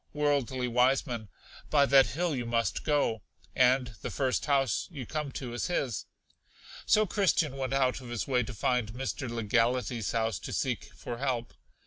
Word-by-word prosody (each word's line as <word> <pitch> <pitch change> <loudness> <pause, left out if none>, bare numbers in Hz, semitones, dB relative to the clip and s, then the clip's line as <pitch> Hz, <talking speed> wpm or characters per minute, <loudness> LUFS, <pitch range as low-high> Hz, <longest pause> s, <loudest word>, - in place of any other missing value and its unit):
Worldly 140 -4 0
Wiseman. 125 -2 +1 0.4
By 145 -2 +5
that 135 -1 +6
hill 170 0 -1
you 120 -2 -3
must 115 0 0
go, 145 -7 +1 0.3
and 125 -1 +3
the - - -4
first 130 +1 -1
house 135 -5 +1
you 140 -8 -7
come 150 0 -3
to 125 -3 -5
is 120 - -2
his. 135 - -2 0.8
So 215 0 +5
Christian 175 -7 +1
went 135 -1 -2
out 130 -1 +1
of 125 - -10
his 120 -2 -3
way 125 -2 +2
to 125 +1 -5
find 115 0 0
Mr. 130 +1 -4
Legality's 115 0 0
house 115 -1 0
to - - -6
seek - - -1
for 120 -1 -6
help. 125 -3 -2
130 Hz, 165 wpm, -30 LUFS, 120-140 Hz, 0.8 s, that